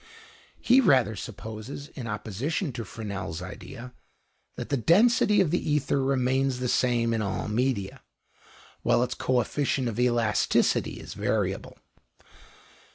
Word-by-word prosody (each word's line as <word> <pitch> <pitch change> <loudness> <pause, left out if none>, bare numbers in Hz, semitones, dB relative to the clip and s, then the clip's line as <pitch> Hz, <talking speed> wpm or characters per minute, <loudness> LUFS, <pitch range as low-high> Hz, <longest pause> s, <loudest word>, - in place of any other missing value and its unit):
He 255 +2 +5
rather 125 - +4
supposes, 110 +7 -7
in 120 -4 -7
opposition 115 - -3
to 120 -1 -5
Fresnel's 100 -7 -5
idea, 125 +2 -9 0.6
that - - -6
the 140 - +1
density 205 - +4
of 170 -5 +1
the 175 - +1
ether 140 -2 +1
remains 130 0 +1
the 125 0 -2
same 120 -2 +2
in 110 - 0
all 100 -1 -2
media, 110 -3 -1 0.8
while 120 - +3
its 125 0 -2
coefficient 130 +1 0
of 115 0 -3
elasticity 120 -3 +2
is - - -8
variable. - - -2
125 Hz, 125 wpm, -27 LUFS, 110-140 Hz, 0.8 s, He